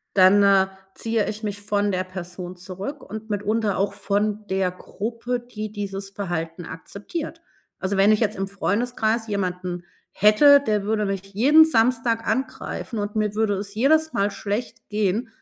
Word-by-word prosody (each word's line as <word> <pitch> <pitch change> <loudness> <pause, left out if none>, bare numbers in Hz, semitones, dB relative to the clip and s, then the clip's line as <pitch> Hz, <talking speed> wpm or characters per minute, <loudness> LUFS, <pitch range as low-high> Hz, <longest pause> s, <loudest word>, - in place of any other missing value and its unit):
dann, 195 +1 +7
äh, 195 -1 +5 0.3
ziehe 225 -2 -1
ich 215 +1 -5
mich 205 -1 -4
von 205 0 0
der 185 0 -1
Person 180 0 -7
zurück 190 +10 -7
und 220 +2 -7
mitunter 210 0 0
auch 195 +1 +1
von 205 +1 -1
der 190 -1 +1
Gruppe, 230 +6 -4
die 215 -3 -7
dieses 195 -1 -5
Verhalten 175 -4 -4
akzeptiert. 255 - -7 0.4
Also, 190 +1 -1
wenn 200 +2 +5
ich 215 - +2
jetzt 215 -2 +1
im 195 0 -2
Freundeskreis 225 +3 -1
jemanden 180 -3 -3 0.3
hätte, 280 +8 +6
der 210 -2 +1
würde 215 0 0
mich 195 -1 -2
jeden 290 +9 +7
Samstag 230 -4 +1
angreifen 260 -3 -3
und 205 0 -3
mir 210 -1 0
würde 215 -1 +1
es 200 +1 -5
jedes 315 +7 +3
Mal 200 +1 +1
schlecht 220 +3 -4
gehen, 210 +2 0
205 Hz, 160 wpm, -23 LUFS, 195-225 Hz, 0.4 s, dann